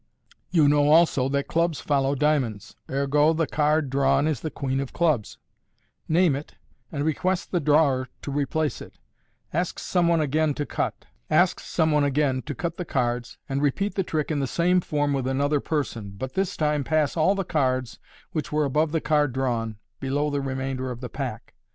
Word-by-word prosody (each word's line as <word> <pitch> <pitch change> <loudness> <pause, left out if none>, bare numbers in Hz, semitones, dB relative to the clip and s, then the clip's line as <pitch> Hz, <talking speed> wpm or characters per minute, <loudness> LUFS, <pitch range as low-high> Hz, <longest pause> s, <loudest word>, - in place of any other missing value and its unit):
You 160 -5 +4
know 145 0 +4
also 155 -5 +4
that 140 0 -1
clubs 165 -2 0
follow 140 -1 +1
dia 150 +2 +3
monds: 110 -5 -6 0.2
ergo, 145 +3 +2
the 165 0 +1
card 150 -1 +1
drawn 135 +1 +3
is 155 -6 0
the 155 - -4
queen 135 -2 -2
of 135 -2 -4
clubs. 155 -11 0 0.7
Name 165 -2 +3
it, 145 +2 -7 0.4
and 140 - -3
MODERN - - 0
MAGIC 155 -2 0
request 185 0 -1
the 175 - +1
drawer 145 -4 +3
to 140 - -4
replace 145 +2 -1
it. - - -12 0.6
Ask 175 +2 -1
some 175 -2 +1
one 170 -1 +3
again 155 0 +1
to 145 - -2
cut. - - -3 0.2
the 150 +2 +1
cards, 120 -2 -1
and 135 +1 -1
repeat 170 +8 0
the 195 - 0
trick 160 -4 -2
in 150 - 0
the 135 - 0
same 180 +5 +2
form 145 -3 0
with 135 -2 -1
another 140 +2 +1
person, 115 -10 -3
but 130 +4 -5
this 195 -1 -1
time 150 -2 +1
pass 155 -1 +1
all 170 +5 +3
the 195 - -1
cards 130 -8 -1 0.3
which 155 -3 -3
were 150 0 +2
above 150 +3 +1
the 160 - +1
card 150 -4 +2
drawn, 115 -4 -1 0.2
below 145 +2 -1
the 145 -1 -1
remainder 130 -1 -3
of 125 -1 -6
the 125 - -5
pack. 125 -5 -6
145 Hz, 180 wpm, -25 LUFS, 135-155 Hz, 0.7 s, You